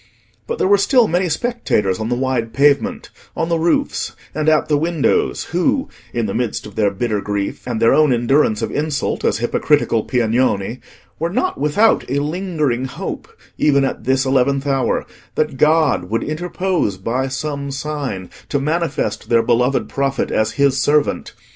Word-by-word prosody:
But 470 - -3
there - - +1
were 200 0 +5
still 240 +2 +4
many 175 +2 0
spectators 155 - 0
on 110 +1 -3
the 120 - +1
wide 125 -3 -1
pavement, 145 - +2 0.3
on 165 - -1
the 165 -1 +1
roofs, 165 +1 0 0.2
and 155 +1 +1
at 155 -1 +3
the 150 - +2
windows, 160 0 +1
who, 180 - +1 0.2
in 115 -2 -1
the 100 - -3
midst 120 -3 -2
of 105 - -10
their 105 -2 +2
bitter 105 +1 -2
grief 100 +2 -3
and 120 -3 -2
their 115 0 +4
own 155 -2 +4
endurance 120 -2 +2
of - - -2
insult 150 -1 -2
as - - +1
hypocritical 120 -1 +1
Piagnoni, 120 -2 0 0.4
were 165 - -1
not 365 - -1
without 175 +10 +3
a 135 - 0
lingering 150 -5 -1
hope, 130 - -6 0.3
even 140 -2 +3
at - - -4
this 130 +1 +2
eleventh 135 +1 +1
hour, 135 -2 0 0.3
that 150 -3 -1
God 150 - +3
would 115 +2 -1
interpose, 175 - -1
by 120 +7 -2
some 140 +1 -4
sign, 135 -9 -4 0.2
to 145 - 0
manifest 155 +1 -2
their 115 -1 +4
beloved 125 +3 +1
prophet 135 0 -1
as 110 0 +1
His 140 -1 +2
servant. 150 0 +1
140 Hz, 165 wpm, -19 LUFS, 120-155 Hz, 0.4 s, were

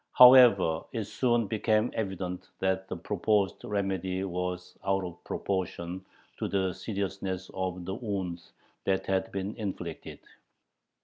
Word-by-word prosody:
However, 120 -10 +8
it 115 -3 -1
soon 120 +2 +1
became 110 +2 +1
evident 95 -4 -4
that 95 0 0
the - - -4
proposed 100 +2 0
remedy 95 -2 -1
was 90 -1 -3
out 95 0 +1
of 90 -1 -8
proportion 95 -1 -3 0.3
to - - -2
the 95 -2 0
seriousness 95 -2 -4
of 90 -1 -3
the 95 - -3
wound 95 -6 -3 0.4
that 95 -1 +1
had 95 -1 0
been 100 +2 -3
inflicted. 90 -6 -5
95 Hz, 125 wpm, -29 LUFS, 90-100 Hz, 0.4 s, However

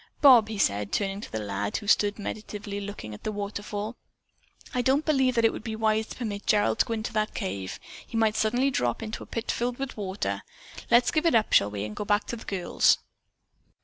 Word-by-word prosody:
"Bob," 245 -7 +7
he 220 - -4
said, 100 - +1
turning 195 0 -1
to - - -9
the 110 - -2
lad 100 -1 -2
who 210 - -8
stood 205 0 +3
meditatively 205 -1 -5
looking 200 - -7
at 105 - -10
the 215 - -2
waterfall, 205 +1 -4 0.8
"I 250 - +1
don't 270 +5 +2
believe 265 -5 +2
that 230 -1 +3
it 225 - +4
would - - -7
be 220 -1 -4
wise 220 0 +1
to - - -8
permit 210 -5 -4
Gerald 205 - +3
to - - +5
go 230 - -1
into 220 0 -4
that 215 0 -1
cave. 95 0 -4 0.3
He 225 - -4
might 220 -1 +3
suddenly 245 +6 +2
drop 120 - -1
into 220 0 -5
a - - -9
pit 230 0 -3
filled 240 +1 -2
with 270 -1 -4
water. 195 -1 -3 0.5
Let's 235 +1 +5
give 315 +2 +2
it 330 - +4
up, 220 -1 +2
shall 100 - +5
we, 105 -1 -4
and 105 0 -5
go - - -3
back 205 0 +2
to - - -2
the 225 - -11
girls?" 190 -3 +3
215 Hz, 225 wpm, -27 LUFS, 195-230 Hz, 0.8 s, Bob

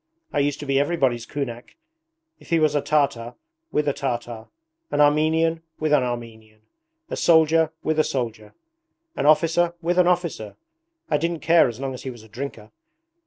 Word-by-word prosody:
I - - +1
used 145 0 0
to - - -6
be 135 -1 +2
everybody's 135 -7 0
kunak. 120 -4 -6 0.6
If - - -18
he 165 - +3
was 155 -2 +2
a 145 - +1
Tartar 140 -5 0 0.4
with 150 0 0
a 145 - +2
Tartar; 120 -4 -4 0.4
an - - -2
Armenian 160 +2 +3 0.2
with 155 -1 0
an 145 - +5
Armenian; 115 -3 -6 0.5
a - - -1
soldier 160 -1 +4
with 155 0 0
a - - +5
soldier; 115 -6 -4 0.6
an - - 0
officer 165 +3 +3
with 175 +1 0
an 180 - +5
officer! 170 - -1 0.5
I 150 - +1
didn't 165 +1 -2
care 165 -1 +5
as 120 -1 -6
long 135 -1 -3
as 130 - -8
he 130 - -5
was 120 -3 -10
a - - -15
drinker. 115 -2 -7
145 Hz, 175 wpm, -23 LUFS, 120-160 Hz, 0.6 s, an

